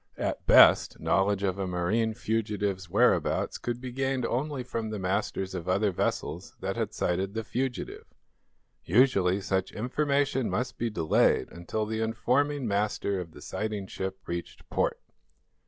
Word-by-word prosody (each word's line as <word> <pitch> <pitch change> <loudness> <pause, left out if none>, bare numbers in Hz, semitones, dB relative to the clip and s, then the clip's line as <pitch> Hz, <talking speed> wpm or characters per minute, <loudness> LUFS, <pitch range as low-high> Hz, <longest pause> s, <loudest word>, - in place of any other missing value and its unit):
At - - -3
best, - - +7
knowledge 95 +2 +1
of 95 0 0
a 95 - -1
marine 105 +6 0
fugitive's 105 -5 -2
whereabouts - - +2
could 120 0 -3
be 125 0 -6
gained 135 0 -1
only 135 +2 -2
from 115 -3 -4
the 110 - -3
masters 95 0 -2
of 90 -1 -4
other 100 +2 +2
vessels 90 - -3
that - - -3
had - - -2
sighted 95 +3 -1
the 110 - -2
fugitive. 125 +3 -3 0.8
Usually, 95 -3 +3
such 95 -1 -1
information 140 +2 0
must 125 +1 -2
be 120 - 0
delayed 80 -7 +2
until 85 +5 -3
the 110 +1 -2
informing 130 +5 +1
master 100 -1 0
of 85 -3 -7
the - - -12
sighting 105 -2 -3
ship 95 0 -5
reached 85 0 -6
port. - - 0
105 Hz, 150 wpm, -28 LUFS, 95-120 Hz, 0.8 s, best